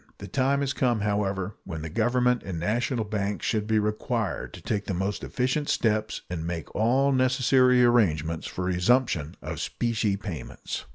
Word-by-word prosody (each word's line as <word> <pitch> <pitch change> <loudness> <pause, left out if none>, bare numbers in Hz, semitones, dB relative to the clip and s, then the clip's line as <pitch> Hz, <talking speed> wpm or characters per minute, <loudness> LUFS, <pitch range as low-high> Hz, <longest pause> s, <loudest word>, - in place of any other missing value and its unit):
The 100 - -8
time 135 +6 +1
has 140 -1 0
come, 120 -4 +1
however, 100 -2 -1
when 80 -4 -6
the 80 - -4
Government 125 +4 +2
and 90 -4 -5
national 115 +5 0
banks 105 -1 -2
should 105 -2 0
be 110 0 +2
required 110 +1 -1
to - - -10
take 100 -1 -1
the 95 - -2
most 95 +3 -2
efficient 130 +4 -1
steps 110 -1 0
and 85 -2 -4
make 85 -3 -5
all 130 +6 +3
necessary 130 -1 +4
arrangements 85 -9 +2
for 90 - -4
a 90 0 0
resumption 90 - +1
of - - -5
specie 110 -4 0
payments. 95 -9 -6
110 Hz, 170 wpm, -26 LUFS, 95-125 Hz, -, necessary